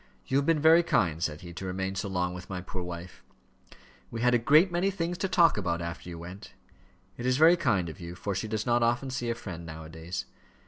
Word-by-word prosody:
"You 135 Hz, -, +1 dB
have 140 Hz, -, +1 dB
been 165 Hz, -2 st, +3 dB
very 160 Hz, +3 st, +7 dB
kind," 85 Hz, -, +1 dB
said 75 Hz, -2 st, -2 dB
he, 85 Hz, 0 st, -9 dB
"to 85 Hz, -, -7 dB
remain 95 Hz, +1 st, -2 dB
so 100 Hz, +1 st, -3 dB
long 90 Hz, -1 st, -1 dB
with 90 Hz, 0 st, -9 dB
my 95 Hz, -2 st, -3 dB
poor 90 Hz, +1 st, -6 dB
wife." 90 Hz, 0 st, -8 dB, 0.9 s
"We 115 Hz, -, -5 dB
had 125 Hz, +1 st, +4 dB
a 120 Hz, -, +4 dB
great 155 Hz, +10 st, +5 dB
many 175 Hz, +3 st, +1 dB
things 175 Hz, -2 st, -2 dB
to 190 Hz, -, 0 dB
talk 170 Hz, -, +4 dB
about, 85 Hz, -3 st, -1 dB
after 85 Hz, +1 st, -6 dB
you 85 Hz, -, -7 dB
went." 90 Hz, +4 st, -10 dB, 0.6 s
"It 120 Hz, -, -5 dB
is 130 Hz, 0 st, +3 dB
very 160 Hz, +4 st, +7 dB
kind 100 Hz, -, +1 dB
of 80 Hz, -, -8 dB
you, 85 Hz, 0 st, -7 dB
for 100 Hz, +2 st, -3 dB
she 95 Hz, +4 st, -3 dB
does 110 Hz, 0 st, -2 dB
not 120 Hz, 0 st, +2 dB
often 120 Hz, +3 st, +1 dB
see 120 Hz, -2 st, -2 dB
a 115 Hz, -, 0 dB
friend, 90 Hz, -7 st, -7 dB
now 80 Hz, -1 st, -8 dB
a 80 Hz, -, -10 dB
days. 80 Hz, +3 st, -5 dB
100 Hz, 245 wpm, -29 LUFS, 85-130 Hz, 0.9 s, very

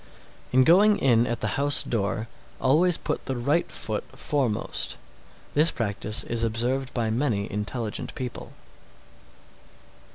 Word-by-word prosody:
688. 125 Hz, -, +1 dB
In 130 Hz, -, +7 dB
going 200 Hz, +7 st, +5 dB
in 120 Hz, -3 st, +3 dB
at 120 Hz, 0 st, -3 dB
the -, -, 0 dB
house 145 Hz, 0 st, +3 dB
door, 110 Hz, 0 st, -2 dB, 0.3 s
always 160 Hz, +6 st, +3 dB
put -, -, -4 dB
the 130 Hz, -2 st, -2 dB
right 145 Hz, +8 st, 0 dB
foot 110 Hz, -2 st, -3 dB
foremost. 130 Hz, -8 st, -1 dB, 0.6 s
This 155 Hz, +3 st, +6 dB
practice 110 Hz, -2 st, -1 dB
is 115 Hz, -1 st, -1 dB
observed 125 Hz, +4 st, -1 dB
by 115 Hz, -3 st, 0 dB
many 115 Hz, -4 st, 0 dB
intelligent 105 Hz, +1 st, -4 dB
people. 125 Hz, -2 st, -6 dB
120 Hz, 130 wpm, -25 LUFS, 110-145 Hz, 0.6 s, In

